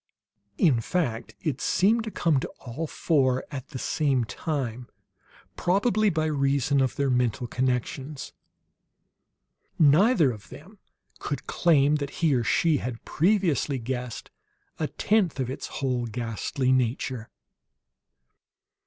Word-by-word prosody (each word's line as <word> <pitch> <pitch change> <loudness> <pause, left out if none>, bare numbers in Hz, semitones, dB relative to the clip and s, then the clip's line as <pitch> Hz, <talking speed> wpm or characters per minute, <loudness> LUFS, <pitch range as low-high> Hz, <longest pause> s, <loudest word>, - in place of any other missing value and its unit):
In 140 -10 +4
fact, 120 -6 -2
it 145 -5 -2
seemed 220 +4 +2
to - - -3
come 165 -8 +1
to - - -4
all 140 +6 -5
four 130 -6 +1
at 135 -4 -6
the 135 - -7
same 135 -2 +1
time, 125 -1 -4 0.7
probably 205 +3 +2
by 160 -3 0
reason 140 -2 +1
of 130 -2 0
their 140 -2 +1
mental 125 -1 +1
connections. 130 +3 -2 1.4
Neither 160 - +5
of 105 -3 -11
them 195 +7 -13 0.4
could 145 - -4
claim 150 -3 +3
that 140 -1 -4 0.2
he 155 - +4
or 120 -2 +2
she 160 +5 +2
had 125 -3 -6
previously 170 - +1
guessed 125 -1 -5 0.5
a 155 - 0
tenth 200 -7 +1
of 130 -1 -1
its 135 - -5
whole, 125 -3 -2
ghastly 120 - -2
nature. 125 -2 0
140 Hz, 125 wpm, -26 LUFS, 125-160 Hz, 1.4 s, Neither